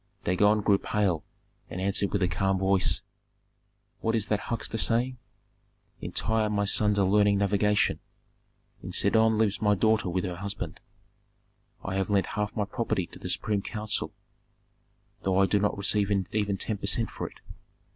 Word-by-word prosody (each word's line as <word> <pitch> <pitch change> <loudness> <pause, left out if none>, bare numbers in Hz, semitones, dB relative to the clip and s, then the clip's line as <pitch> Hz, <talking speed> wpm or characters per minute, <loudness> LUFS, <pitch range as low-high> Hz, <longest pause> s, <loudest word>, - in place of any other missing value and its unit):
Dagon 105 +4 +3
grew 100 -1 +3
pale 95 -7 0 0.5
and 90 - -6
answered 100 +1 +1
with 100 -2 0
a - - +3
calm 95 +1 0
voice, 95 0 +1 1.0
"What 115 0 0
is 110 -2 0
that 105 -2 0
huckster 115 0 -3
saying? 125 +2 +1 0.8
In - - -6
Tyre 110 -1 0
my 100 -1 0
sons 105 0 +2
are 100 - +3
learning 100 +1 +4
navigation; 100 +1 +2 0.8
in - - -7
Sidon 110 0 +3
lives 105 -2 +1
my 105 -1 +3
daughter 110 -1 +2
with 90 +1 -1
her 90 -2 -4
husband. 100 +3 -5 1.0
I 95 0 -3
have 95 +1 -1
lent 100 -1 +2
half 105 -1 -2
my 105 -3 0
property 105 -4 -2
to - - -9
the - - -6
supreme 105 -2 0
council, 105 +1 -2 1.1
though 95 -1 0
I 95 - +5
do 100 +2 +2
not 105 0 0
receive 100 0 +1 0.2
even 105 -2 0
ten 105 +2 -2
per 100 - -4
cent 115 +3 +1
for - - -5
it. - - -20
100 Hz, 165 wpm, -27 LUFS, 95-110 Hz, 1.1 s, I